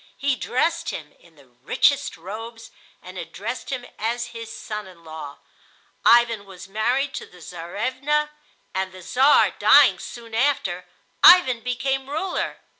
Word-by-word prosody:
He 280 Hz, -1 st, 0 dB
dressed 330 Hz, +7 st, -1 dB
him 150 Hz, -2 st, -7 dB
in 170 Hz, -2 st, -22 dB
the 140 Hz, -2 st, -20 dB
richest 130 Hz, -, 0 dB
robes 225 Hz, +6 st, -9 dB, 0.3 s
and 185 Hz, 0 st, -9 dB
addressed 195 Hz, +9 st, -6 dB
him 255 Hz, -2 st, -4 dB
as 235 Hz, +2 st, -2 dB
his 230 Hz, -1 st, -8 dB
son 210 Hz, -3 st, -6 dB
in 175 Hz, -3 st, -16 dB
law. 155 Hz, -3 st, -9 dB, 0.7 s
Ivan 235 Hz, -3 st, +4 dB
was 190 Hz, -1 st, -12 dB
married 245 Hz, +7 st, 0 dB
to -, -, -6 dB
the 180 Hz, -, -18 dB
Czarevna, 255 Hz, -, -2 dB, 0.4 s
and, 190 Hz, 0 st, -2 dB
the 185 Hz, -1 st, -12 dB
Czar 265 Hz, +9 st, +4 dB
dying -, -, +6 dB
soon 230 Hz, -2 st, -10 dB
after, 225 Hz, -8 st, 0 dB, 0.3 s
Ivan 265 Hz, -10 st, +8 dB
became 265 Hz, +3 st, -2 dB
ruler. 340 Hz, +6 st, -3 dB
230 Hz, 140 wpm, -23 LUFS, 185-265 Hz, 0.7 s, Ivan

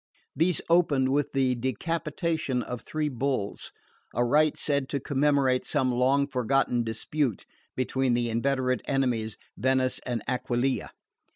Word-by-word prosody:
These 170 Hz, 0 st, +2 dB
opened 150 Hz, -6 st, +3 dB
with 145 Hz, +1 st, +1 dB
the 130 Hz, -2 st, +2 dB
decapitation 150 Hz, -, -2 dB
of 125 Hz, +1 st, -6 dB
three 155 Hz, -1 st, -2 dB
bulls: 130 Hz, -6 st, -2 dB, 0.4 s
a 120 Hz, +1 st, +2 dB
rite 150 Hz, +4 st, +3 dB
said 140 Hz, -3 st, 0 dB
to 140 Hz, -, -1 dB
commemorate 140 Hz, -2 st, +2 dB
some 130 Hz, -4 st, 0 dB
long 130 Hz, +3 st, +3 dB
forgotten 125 Hz, -2 st, +1 dB
dispute 115 Hz, +2 st, -2 dB, 0.3 s
between 130 Hz, -1 st, +1 dB
the 120 Hz, 0 st, 0 dB
inveterate 130 Hz, +2 st, 0 dB
enemies, 120 Hz, -5 st, 0 dB, 0.2 s
Venice 130 Hz, 0 st, +1 dB
and 120 Hz, -4 st, -3 dB
Aquileia. 125 Hz, +1 st, -1 dB
130 Hz, 125 wpm, -27 LUFS, 125-145 Hz, 0.4 s, opened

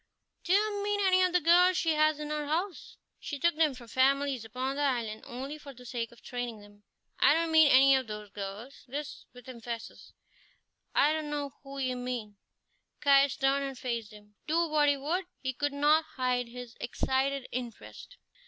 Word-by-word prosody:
"Do 345 Hz, -, -3 dB
you 410 Hz, +1 st, +2 dB
mean 410 Hz, 0 st, 0 dB
any 375 Hz, -2 st, +4 dB
of 365 Hz, -1 st, +3 dB
the 360 Hz, -, +3 dB
girls 355 Hz, +2 st, +5 dB
she 325 Hz, -, +1 dB
has 310 Hz, 0 st, +2 dB
in 300 Hz, 0 st, -5 dB
her 300 Hz, -1 st, -2 dB
house? 340 Hz, +4 st, -3 dB, 0.2 s
She 290 Hz, -, -5 dB
took 340 Hz, +3 st, +2 dB
them 310 Hz, -4 st, +2 dB
from 245 Hz, -2 st, -12 dB
families 270 Hz, 0 st, +2 dB
upon 255 Hz, +5 st, -3 dB
the 290 Hz, -, -2 dB
island 235 Hz, -6 st, -1 dB
only 270 Hz, +5 st, -6 dB
for 280 Hz, -2 st, -11 dB
the 250 Hz, +1 st, -14 dB
sake 235 Hz, -2 st, -4 dB
of 235 Hz, -, -19 dB
training 245 Hz, -3 st, -5 dB
them." 205 Hz, 0 st, -17 dB, 0.4 s
"I 290 Hz, -, +6 dB
don't 330 Hz, 0 st, 0 dB
mean 315 Hz, -1 st, +7 dB
any 270 Hz, +1 st, +7 dB
of 260 Hz, -2 st, -1 dB
those 210 Hz, -1 st, -7 dB
girls!" 205 Hz, +6 st, -8 dB
this 285 Hz, +3 st, -6 dB
with 250 Hz, +1 st, -15 dB
emphasis. 235 Hz, -2 st, -8 dB, 0.8 s
"I 295 Hz, +2 st, +4 dB
don't 310 Hz, -1 st, -3 dB
know 290 Hz, -2 st, -3 dB
who 275 Hz, 0 st, -10 dB
you 255 Hz, -2 st, -1 dB
mean." 245 Hz, -5 st, -5 dB, 0.6 s
Caius 280 Hz, -1 st, +4 dB
turned 275 Hz, +1 st, +2 dB
and 270 Hz, -2 st, -5 dB
faced 235 Hz, -4 st, -4 dB
him. 210 Hz, 0 st, -16 dB
Do 335 Hz, +2 st, +2 dB
what 300 Hz, -2 st, +3 dB
he 285 Hz, -, +2 dB
would, 340 Hz, +7 st, -2 dB
he 265 Hz, -1 st, -3 dB
could 290 Hz, +3 st, -1 dB
not 300 Hz, +3 st, +3 dB
hide 250 Hz, -1 st, 0 dB
his 245 Hz, 0 st, -9 dB
excited 265 Hz, +2 st, -1 dB
interest. 250 Hz, -, -7 dB
275 Hz, 190 wpm, -30 LUFS, 245-305 Hz, 0.8 s, mean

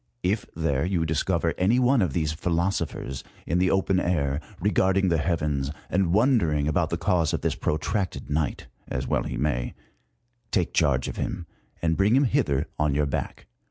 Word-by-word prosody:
If 100 Hz, +4 st, 0 dB
there 75 Hz, -5 st, 0 dB
you 90 Hz, -2 st, 0 dB
discover 80 Hz, +1 st, 0 dB
any 100 Hz, +7 st, +3 dB
one 125 Hz, 0 st, +4 dB
of 90 Hz, -8 st, 0 dB
these 75 Hz, -1 st, 0 dB
philoso 85 Hz, +2 st, 0 dB
phers 65 Hz, -2 st, -6 dB, 0.2 s
in 85 Hz, +3 st, +1 dB
the 90 Hz, 0 st, +3 dB
open 95 Hz, 0 st, +2 dB
air, 75 Hz, -5 st, 0 dB, 0.2 s
regarding 95 Hz, 0 st, +2 dB
the 85 Hz, -2 st, +2 dB
heavens, 75 Hz, -5 st, 0 dB, 0.2 s
and 90 Hz, -2 st, +2 dB
wonder 110 Hz, -, +3 dB
ing 75 Hz, -1 st, 0 dB
about 75 Hz, -, +1 dB
the -, -, -1 dB
cause 85 Hz, -4 st, +1 dB
of -, -, -4 dB
this -, -, 0 dB
protracted 90 Hz, +5 st, -2 dB
night, 75 Hz, 0 st, -1 dB, 0.2 s
as 65 Hz, -, -3 dB
well -, -, +1 dB
he -, -, -4 dB
may, 60 Hz, -3 st, -1 dB, 0.7 s
take 90 Hz, -5 st, 0 dB
charge 70 Hz, -5 st, +2 dB
of -, -, -6 dB
him, 90 Hz, -3 st, -3 dB, 0.4 s
and 80 Hz, -1 st, +1 dB
bring 100 Hz, +5 st, +4 dB
him 135 Hz, -, +5 dB
hither 105 Hz, -, +1 dB
on 75 Hz, -2 st, +2 dB
your 75 Hz, 0 st, +2 dB
back. 70 Hz, -, -4 dB
85 Hz, 185 wpm, -26 LUFS, 75-95 Hz, 0.7 s, him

